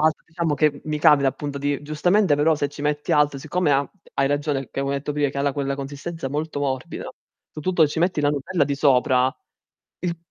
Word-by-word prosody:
altro, 155 0 +2
diciamo 160 -2 -1
che 145 0 +1
mi 155 -1 -2
capita 140 -2 +5
appunto 140 +1 -4
di 145 0 -1
giustamente 170 +3 +2
però 155 +2 +3
se 145 -1 -1
ci 145 0 -9
metti 150 0 -1
altro, 145 -2 +3
siccome 155 +2 0
ha 140 0 +1 0.3
hai 135 - +2
ragione, 145 -2 -1
che - - -3
avevo 140 0 -1
detto 145 +1 -3
prima 145 -1 +1
che 140 - -5
ha 140 0 +1
quella 140 -1 -2
consistenza 145 +2 -5
molto 150 +2 -3
morbida, 130 -2 -3 0.5
soprattutto 160 +1 +2
ci 150 - -4
metti 175 -3 +1
la 145 - +3
nutella 145 +3 0
di 140 0 -1
sopra, 130 -2 +3 0.7
il 175 -1 -2
145 Hz, 205 wpm, -23 LUFS, 140-155 Hz, 0.7 s, capita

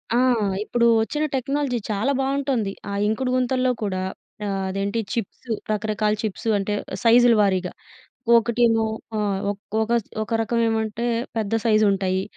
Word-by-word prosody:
ఆ! - - +4 0.5
ఇప్పుడూ 235 +2 +1 0.2
ఒచ్చిన 295 +7 -1
టెక్నాలజీ 275 0 -1
చాలా 215 +6 0
బావుంటోంది. 270 -6 0 0.2
ఆ - - -4 0.2
ఇంకుడు 250 +4 0
గుంతల్లో 255 0 +1
కూడా 185 -2 -1 0.4
ఆహ్, 195 -1 -2
అదేంటి, 200 +3 -2
చిప్స్ 230 +2 -5 0.2
రకరకాల 215 0 0
చిప్స్. 215 0 -4
అంటే, 200 +1 -2 0.3
సైజులు 240 0 +6
వారీగా. 185 -3 +1 0.7
ఒకటేమో 230 -1 +2 0.3
ఆ! - - 0 0.3
ఒక్ 205 0 -5 0.2
ఒకస్ 230 -1 0 0.2
ఒక 215 - -7
రకవేమంటే, 225 0 0 0.3
పెద్ద 220 -1 -2
సైజుంటాయి. 200 -4 +2
225 Hz, 125 wpm, -23 LUFS, 205-240 Hz, 0.7 s, సైజులు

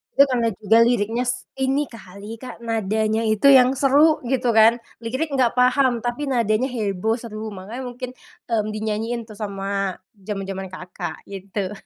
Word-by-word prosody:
Itu 280 - +8
karena 240 -3 +1
juga 220 +1 +4
liriknya 235 0 +1 0.3
ini 270 +2 0
kali 205 0 -10
Kak, 250 0 -10
nadanya 220 -1 0
itu 215 +4 +2
yang 260 -2 +7
seru 290 +3 +5
gitu 250 -2 +1
kan, 220 +1 +6 0.3
lirik 260 +7 -3
enggak 255 -3 +2
paham, 250 -1 +3
tapi 245 +4 -2
nadanya 230 +1 +1
heboh, 220 -3 -1
seru, 220 -2 -7
makanya 220 +8 -7
mungkin, 250 +1 -6 0.4
mmm, 215 -2 +1
dinyanyiin 220 +2 -2
tuh 215 -2 -12
sama 195 -2 -2 0.3
jaman-jaman 195 -2 -4
Kakak, 180 -3 -7
gitu. 195 0 -4
225 Hz, 145 wpm, -22 LUFS, 205-250 Hz, 0.4 s, Itu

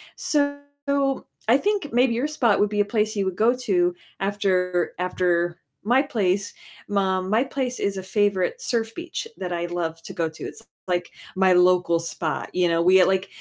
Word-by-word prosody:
So 285 -1 0 0.9
I 245 +4 +6
think 400 -4 -1
maybe 245 0 +3
your 255 +6 0
spot 245 -9 +2
would 205 0 +3
be 210 -1 -2
a - - +1
place 215 0 0
you 200 -1 0
would 190 -1 -2
go 230 +3 +4
to 180 -8 +1 0.2
after 185 -3 0
after 175 -1 0 0.3
my 250 +4 +4
place, 200 -7 -1 0.4
um, 190 -1 +1
my 225 +4 +3
place 260 -2 -3
is 200 -1 -1
a 190 - -4
favorite 205 - 0
surf 225 - -2
beach 345 +6 -5
that 180 -1 -4
I 170 0 -2
love 165 -2 -3
to - - -8
go 165 -1 -1
to, 160 - -11
it's, - - -8 0.3
like, 175 -1 -1 0.2
my 190 -1 +4
local 180 -1 +4
spot, 165 -1 -3
you 180 -1 +3
know, 165 0 +2
we 185 +2 +6
like, 190 +1 +1
195 Hz, 185 wpm, -24 LUFS, 180-235 Hz, 0.9 s, I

